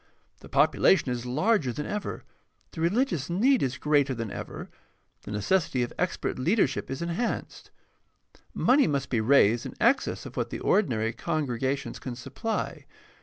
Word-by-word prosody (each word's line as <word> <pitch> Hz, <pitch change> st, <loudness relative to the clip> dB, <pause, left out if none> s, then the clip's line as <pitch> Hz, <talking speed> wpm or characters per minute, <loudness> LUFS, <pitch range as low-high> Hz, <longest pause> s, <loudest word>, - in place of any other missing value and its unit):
The -, -, -14 dB
population 155 Hz, -9 st, +3 dB
is 125 Hz, 0 st, -4 dB
larger 155 Hz, -, +1 dB
than 150 Hz, +5 st, -5 dB
ever, 210 Hz, 0 st, -4 dB, 0.5 s
the 160 Hz, -, -7 dB
religious 175 Hz, -, +1 dB
need 240 Hz, +10 st, +3 dB
is 135 Hz, -1 st, -1 dB
greater 145 Hz, -3 st, +2 dB
than 115 Hz, -3 st, -4 dB
ever, -, -, -7 dB, 0.6 s
the -, -, -7 dB
necessity 125 Hz, -, +1 dB
of 120 Hz, -, -5 dB
expert 180 Hz, -6 st, -1 dB
leadership 165 Hz, -, +1 dB
is 135 Hz, +5 st, -4 dB
enhanced. 170 Hz, +8 st, -3 dB, 0.8 s
Money 275 Hz, -1 st, +3 dB
must 140 Hz, -3 st, -2 dB
be 115 Hz, -3 st, +2 dB
raised 115 Hz, -1 st, +4 dB
in -, -, -10 dB
excess 265 Hz, +4 st, +2 dB
of -, -, -9 dB
what -, -, -2 dB
the -, -, -5 dB
ordinary 115 Hz, -, +1 dB
congregations 140 Hz, -2 st, -2 dB
can 125 Hz, -2 st, -6 dB
supply. 140 Hz, -, -4 dB
145 Hz, 150 wpm, -27 LUFS, 125-190 Hz, 0.8 s, raised